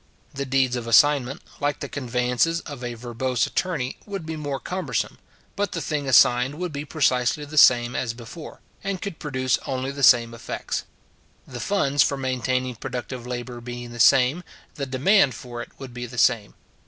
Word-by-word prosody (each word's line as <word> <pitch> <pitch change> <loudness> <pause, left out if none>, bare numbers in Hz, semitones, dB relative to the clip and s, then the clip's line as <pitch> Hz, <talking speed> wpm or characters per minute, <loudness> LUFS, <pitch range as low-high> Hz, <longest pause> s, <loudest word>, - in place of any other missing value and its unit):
The 140 -1 -4
deeds 130 -1 +2
of 120 -2 -4
assignment, 135 +2 +4 0.2
like 145 0 -1
the - - -4
conveyances 125 +5 0
of 140 -5 -9
a 120 -1 -4
verbose 120 +1 -1
attorney, 150 -9 -2
would 195 -5 -5
be 160 0 -4
more 145 -3 -3
cumbersome; 185 +1 -3 0.4
but 205 -2 -1
the - - -2
thing 150 -3 -2
assigned 125 +2 +5
would 175 0 -4
be 145 +1 -4
precisely 140 -1 +1
the 150 +2 -9
same 120 -2 +6
as 115 -2 -2
before, 125 +7 -10 0.2
and 195 -2 -2
could 200 -5 -6
produce 130 -3 0
only 130 0 -2
the 140 0 -7
same 120 -3 +6
effects. 115 - -4 0.6
The 125 -2 -8
funds 145 - +1
for 140 +1 +2
maintaining 130 -1 -1
productive 125 0 -6
labour 120 0 -5
being 120 0 -7
the 120 - -9
same, 130 +8 +5 0.3
the 140 -3 -4
demand 135 - +3
for 120 +2 -7
it - - -8
would 135 -3 -9
be 120 0 -5
the 125 +1 -10
same. 115 -4 +2
130 Hz, 180 wpm, -24 LUFS, 120-145 Hz, 0.6 s, same